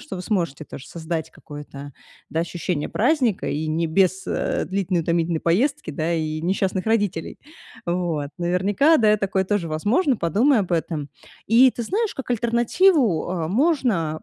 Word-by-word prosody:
что 295 - -8
вы 180 - -6
сможете 170 -8 -2
тоже 140 0 -10
создать 165 -1 -4
какое-то, 145 -1 -10 0.4
да, 160 - -2
ощущение 170 -2 -3
праздника 250 - +1
и 150 +2 -2
не 165 +2 0
без, 190 +3 +2
э, - - -1
длительной 190 -2 -1
утомительной 170 0 0
поездки, 245 - 0
и 155 0 -2
несчастных 190 +2 -1
родителей. 205 -7 -1 0.5
Вот. 170 -5 -1
Наверняка, 190 - +3
да, 215 -2 +4
и - - +4
такое 195 -1 0
тоже 195 -3 -1
возможно, 230 - +1
подумай 220 - +2
об 185 - -4
этом. 160 -3 -2 0.4
И 245 +4 +6
ты 240 - -4
знаешь, 425 - -1
как 265 -2 -7
альтернативу, 240 - +2
э, 165 -3 -2
можно 220 - +1
185 Hz, 150 wpm, -22 LUFS, 160-230 Hz, 0.5 s, И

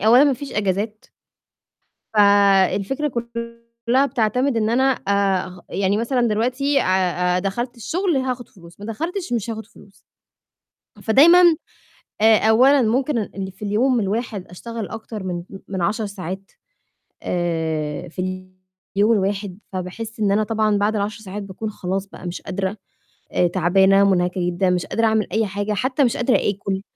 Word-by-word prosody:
أولًا 245 +6 +7
ما 285 - +3
فيش 280 +2 -6
إجازات. 210 +2 -2 1.1
فالفكرة 200 +5 +3 0.8
كُلّها 260 +4 +4
بتعتمد 250 0 0
إن 215 -1 +1
أنا 245 +3 +2
أغ 195 -5 -1
يعني 200 +1 0
مثلًا 245 +3 0
دلوقتي 255 +6 +1
آآ - - -2 0.5
آآ - - +2
دخلت 240 +6 -3
الشُغل 345 - -1
هاخُد 255 -2 -3
فلوس، 170 -1 -17
ما 205 - -8
دخلتش 330 - -4
مش 230 -1 -2
هاخُد 220 -1 -5
فلوس. 200 -2 -20 1.0
فدايمًا 320 +10 +6 0.8
آآ 220 0 +6
أولًا 260 +5 +5
ممكن 255 +4 +1
ال 215 - -4
اللي 190 -1 -4
في 195 +3 -9
اليوم 240 +5 +2
الواحد 210 -1 -3
أشتغل 225 +4 -7
أكتر 220 -2 -7
من 185 -2 -3
م 195 - -9
من 190 -2 -4
10 215 +5 0
ساعات 195 -1 -7 0.7
آآ 160 -2 -2
في 185 +1 -5 0.5
اليوم 210 +3 +4
الواحد، 200 -2 -1
فباحِس 215 +5 -6
إن 205 - +2
أنا 215 +2 +2
طبعًا 215 -1 +1
بعد 210 +2 +1
ال10 210 +1 -3
ساعات 205 0 -6
باكون 200 +3 -6
خلاص 195 0 -3
بقى 185 - -11
مش 175 0 -5
قادرة، 190 +1 -3 0.6
آآ 180 - +3
تعبانة، 190 +3 +4
مٌنهكَة 180 -2 +1
جدًا، 180 +1 +1
مش 180 -1 0
قادرة 230 0 +1
أعمل 220 -2 +2
أي 220 +2 +1
حاجة، 205 +1 -3
حتّى 260 +7 +1
مِش 250 +2 +1
قادرة 245 +1 +2
آكُل، 195 -1 -4
210 Hz, 155 wpm, -21 LUFS, 190-235 Hz, 1.1 s, أولًا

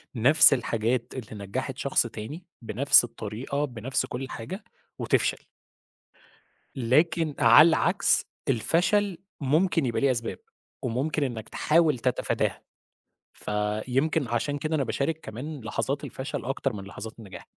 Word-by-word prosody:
نفس 140 +6 +6
الحاجات 120 -1 -1
اللي 110 -5 -7
نجّحِت 130 +5 -4
شخص 135 -3 +1
تاني، 115 +11 -8 0.2
بنَفْس 120 +4 +5
الطريقة 120 +5 -4
بنَفْس 125 0 -2
كُلّ 130 +2 -6
حاجة 185 - -7 0.4
وتفشل. - - 0 1.3
لكن 150 +5 +2
على 120 +8 +8
العكس 175 +4 +2 0.2
الفَشَل 175 - +1 0.2
ممكن 155 +2 +2
يبقى 115 - -1
ليه 140 -1 +4
أسباب، 115 -2 -3 0.4
وممكن 135 +5 -1
إنَّك 120 -5 -4
تحاول 155 -5 +2
تتفاداها، 125 0 -1 0.7
فيمكن 125 +8 -1
عشان 130 +5 -1
كده 155 +2 -2
أنا 140 - 0
باشارك 155 +6 -2
كمان 135 +7 -7
لحظات 140 +5 -3
الفَشَل 130 0 -5
أكتر 135 0 -2
من 100 -3 -7
لحظات 110 +4 -9
النجاح. 95 -6 -11
130 Hz, 125 wpm, -26 LUFS, 115-150 Hz, 1.3 s, على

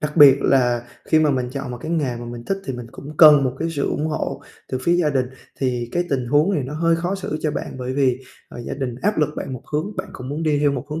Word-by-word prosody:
đặc 150 +1 -3
biệt 140 -3 +9
là 120 -3 +2 0.2
khi 160 - +3
mà 155 -1 +3
mình 125 -2 -1
chọn 135 -1 -5
một 125 - -6
cái 160 - -5
nghề 145 -8 0
mà 120 - -7
mình 120 0 -8
thích 195 +7 -1
thì 135 - -3
mình 120 -1 -7
cũng 145 +2 -10
cần 150 -3 +8
một 130 - 0
cái 165 +1 -1
sự 145 -3 -1
ủng 155 - -1
hộ 155 - -3 0.3
từ 130 - -2
phía 170 - +2
gia 165 -4 +2
đình 130 -3 +1 0.3
thì 125 -3 -1
cái 175 - +1
tình 130 -3 0
huống 150 +9 +3
này 145 - 0
nó 140 +4 -6
hơi 165 +1 +2
khó 175 +3 -2
xử 190 -5 -4
cho 155 - +1
bạn - - -5
bởi 125 0 -3
vì, 130 -2 +2 0.3
à, - - -10
gia - - -3
đình 130 -3 -3
áp 210 -2 +1
lực 150 - +3
bạn - - -4
một 125 - -6
hướng, 175 +8 -2
bạn - - -4
cũng 125 - -8
muốn 150 +4 -3
đi 155 -2 +2
theo 145 -1 +3
một 130 -1 -4
hướng 155 +2 -3
145 Hz, 295 wpm, -21 LUFS, 130-155 Hz, 0.3 s, biệt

